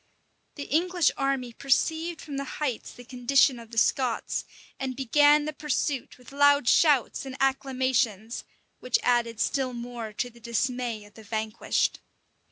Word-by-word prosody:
The 285 - -5
English 345 +2 +2
army 270 -3 -1
perceived 320 +6 0
from 285 -3 -6
the 275 - -2
heights 270 -7 -3
the 245 - -13
condition 250 +1 +2
of 230 -1 -12
the 230 - -10
Scots, 245 +1 +1 0.3
and 265 -1 -3
began 290 +3 +4
the 305 - -3
pursuit 290 -2 -2
with 250 0 -15
loud 285 -2 +4
shouts 290 -5 +3
and 265 -1 -7
acclamations, 260 -5 0 0.4
which 250 - +1
added 235 -2 +1
still 260 0 0
more 235 -2 -6
to 245 +4 -3
the 235 - -18
dismay 235 -1 -2
of 205 - -18
the 220 - -13
vanquished. 220 +1 -1
255 Hz, 150 wpm, -27 LUFS, 235-280 Hz, 0.4 s, began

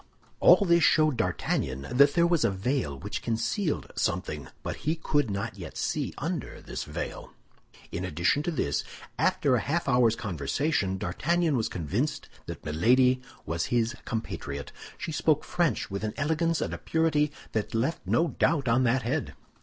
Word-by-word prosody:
All 200 - +7
this 170 -2 +4
showed 155 -4 +4
D'Artagnan 70 - -1
that 140 +3 +5
there 170 -1 +5
was 170 -3 +2
a - - +4
veil 95 - -1
which - - -5
concealed 150 - -1
something; 75 -4 -2 0.2
but - - -4
he 155 +3 -1
could 145 -5 0
not 100 +1 -4
yet 85 -4 -8
see - - -1
under - - -4
this - - -6
veil. - - -6 0.6
In 85 - -3
addition 90 - +1
to 155 - -2
this, 105 - -1 0.4
after 135 - +2
a 125 - +4
half 160 +5 -1
hour's 125 -4 +4
conversation 95 - -1
D'Artagnan 160 - 0
was 115 -3 0
convinced 95 - -2 0.2
that - - -7
Milady 125 +11 +3 0.2
was 85 +1 -1
his 120 +1 +1
compatriot; 70 - -4 0.3
she 165 - -4
spoke 155 -1 +2
French 170 - 0
with 100 +1 -3
an 110 - -3
elegance 160 +3 +1
and - - -2
a - - -5
purity 155 -2 +1 0.2
that 110 0 -2
left 130 +9 0
no 165 +1 +2
doubt 150 -5 +1
on 120 +2 +4
that 125 +1 +2
head. 135 +6 -2
125 Hz, 165 wpm, -28 LUFS, 95-155 Hz, 0.6 s, All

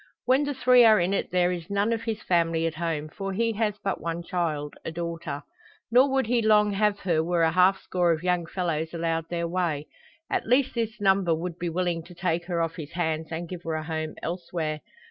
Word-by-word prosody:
When 260 +3 +3
the 285 -1 -2
three 250 -1 +6
are 220 -3 +7
in 180 +2 +1
it - - -1
there 180 0 +2
is 170 -2 -5
none 200 +3 +1
of 225 - -2
his 225 -2 -4
family 165 -2 +1
at 165 - -1
home. 160 -2 -2
For 195 +5 -5
he 230 +3 +1
has 215 -2 +1
but 195 - -2
one 170 +1 -3
child 155 -5 -2
a - - -4
daughter. 165 -3 -5 0.5
Nor 255 +4 +6
would 265 -1 +1
he 235 +1 +2
long 210 -1 +4
have 205 0 +2
her 165 -4 +1
were 170 0 +1
a 160 - +3
half 185 +2 +4
score 175 -2 +1
of 160 0 -1
young 180 -2 +1
fellows 165 -3 -2
allowed 165 -1 -1
their 170 -1 -1
way. 165 -4 -1 0.4
At - - -2
least 255 +3 +3
this 230 -1 -2
number 190 -4 +3
would 170 +1 -5
be 175 - -2
willing 175 0 -1
to 175 0 -13
take 175 -1 -1
her 170 -2 0
off 165 +2 -4
his 155 -3 -7
hands 160 -2 -1
and 170 +1 -4
give 180 0 -7
her 165 -2 -3
a 155 - -3
home 155 -1 -4
elsewhere. 170 -3 -3
175 Hz, 225 wpm, -26 LUFS, 165-200 Hz, 0.5 s, are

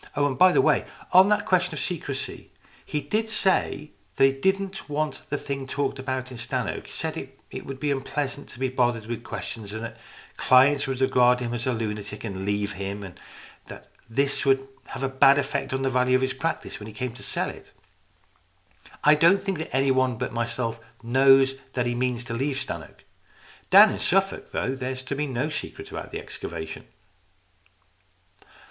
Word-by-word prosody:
Oh, 145 -1 +2
by 180 +8 +6
the - - +4
way, - - +3 0.3
on 185 +1 +8
that 210 -1 +2
question 185 -2 +2
of - - -4
secrecy 145 -6 -4 0.3
he 150 - -3
did 220 +6 -1
say 185 -8 +1 0.2
that - - +3
he 135 - +5
didn't 190 +6 -1
want 150 -2 -2
the 145 - -1
thing 135 -1 -5
talked 135 0 -2
about 130 -1 -3
in 125 - -8
Stannoke, - - -3
said - - -4 0.3
it - - -7
would 135 -1 -6
be 145 +1 0
unpleasant 140 +1 -3
to 120 - -9
be 130 - +1
bothered 120 -3 0
with 120 +1 -5
questions, 105 -1 -6
and 110 +1 -5
that 115 - -7 0.4
clients 140 +3 +5
would 135 -1 -3
regard 125 -1 +4
him 120 -1 -3
as 120 +1 -3
a - - +2
lunatic 105 -2 -4
and 95 -3 -5
leave 100 0 -1
him, 100 +2 -5
and 95 -2 -10 0.5
that - - -11 0.2
this 140 +4 +1
would 135 -1 +2 0.2
have 135 - -7
a - - +2
bad 135 +1 +5
effect 145 - -1
on 130 0 -1
the - - +1
value 125 0 +3
of 130 - +2
his 130 - 0
practice 165 +5 -3
when 105 - -8
he 110 - -9
came 125 +2 -4
to - - -13
sell - - -2
it. - - -15 1.3
I 150 - +7
don't 170 +6 +5
think 195 -2 -3
that 160 - -5
anybody 130 -1 +2
but - - -4
myself 115 0 -2 0.2
knows 135 +2 +5 0.2
that 125 -1 0
he 120 - 0
means 125 0 -1
to 115 - -6
leave 135 +3 -1
Stannoke. - - -6 0.7
Down - - +9
in - - -4
Suffolk, 195 +1 +1
though, 130 - -1
there 130 -1 -3
is 130 0 -6
to 135 - -4
be 150 +1 -1
no 130 +3 -1
secret - - -6
about - - -6
the - - -4
excavation." 80 -1 -7
130 Hz, 190 wpm, -25 LUFS, 120-145 Hz, 1.3 s, Down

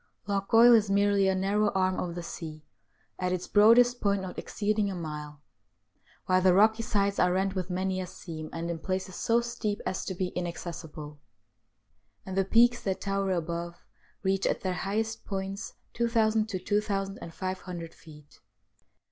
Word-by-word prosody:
Loch 200 0 -2
Goil 235 +1 +8
is 215 -3 +4
merely 200 0 +3
a 190 - +2
narrow 205 +3 +1
arm 185 -1 +1
of 170 -1 -3
the 175 - -5
sea, 155 -2 -8 0.5
at 180 0 0
its 180 -1 -2
broadest 240 +4 +5
point 200 -2 +1
not 185 - -6
exceeding 210 -1 -1
a 195 - -4
mile, 150 -3 -7 0.8
while 185 0 +3
the 185 -1 +5
rocky 220 +3 +5
sides 200 -3 0
are 180 - +4
rent 190 +1 0
with 185 -2 -3
many 185 +1 -1
a 180 - -5
seam, 155 -3 -8
and 170 +1 -3
in 165 - -4
places 185 +1 -3
so 230 +1 +2
steep 230 -3 -3
as 185 - -2
to 190 - -4
be 180 0 -1
inaccessible, 160 -4 -6 1.1
and 190 - -5
the 195 - +3
peaks 240 +4 +4
that 190 -2 -2
tower 195 0 -1
above 170 -1 -3 0.4
reach 195 0 +1
at - - -1
their 185 -1 -1
highest 220 +5 -2
points 195 0 -5 0.2
2,000 225 -2 +1
to 195 - -2
2,500 185 -3 -3
feet. 150 -2 -16
190 Hz, 165 wpm, -28 LUFS, 180-205 Hz, 1.1 s, Goil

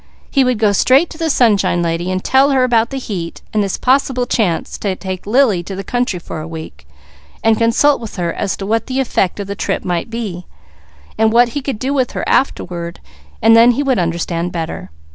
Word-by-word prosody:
He 275 - +3
would 250 -2 +1
go 210 -1 +3
straight 260 - +3
to 320 - -10
the 325 -1 0
Sunshine 205 - +2
Nurse, 175 +3 -1
tell 270 +2 +4
her 265 -2 +3
about 235 -2 +2
the 270 - -5
heat 185 -10 -6
and 215 - +2
this 195 - -2
possible 260 -1 +1
chance 205 -9 -1
to 195 -3 -2
take 185 0 -6
Lily 225 -5 +3
to 190 +3 -7
the 195 - -5
country 245 -3 -1
for 165 -2 -7
a 155 - -7
week, 160 - -9 0.6
and 225 0 +4
consult 230 +6 +2
with 225 - -8
her 175 -3 -2
as 195 - -2
to 195 - -5
what 225 +3 0
the 260 0 -2
effect 210 -7 0
of 200 - -3
the 200 - -4
trip - - -3
might 175 +2 -2
be, 210 -6 -5 0.7
and 220 0 +4
what 240 +1 +4
he 285 +4 -4
could 270 -4 -3
do 265 +5 -2
with 260 -3 0
her - - -3
afterward, 175 -9 -1 0.4
then 230 +2 +6
he 285 - -1
would 265 -6 +1
understand 170 0 -2
better. 160 - -5
220 Hz, 210 wpm, -17 LUFS, 180-255 Hz, 0.7 s, then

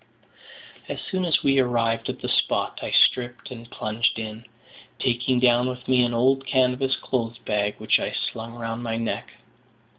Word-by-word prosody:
As - - -4
soon 185 -1 -2
as 165 - +1
we 135 0 +4
arrived 115 -2 +1
at - - -5
the - - -1
spot, - - 0
I - - -4
stripped 120 0 +2
and 115 -1 -9
plunged 110 +2 -1
in, 110 +1 -6 0.5
taking 125 0 +1
down 125 0 +4
with 125 0 -7
me 125 -1 +4
an 120 - +1
old 135 +3 +2
canvas 130 0 +2
clothes 120 -2 -3
bag, 105 -2 -1
which - - +2
I - - -2
slung 115 +1 -4
round 115 0 -4
my 115 -1 -2
neck. 115 0 -3
120 Hz, 170 wpm, -24 LUFS, 115-130 Hz, 0.5 s, we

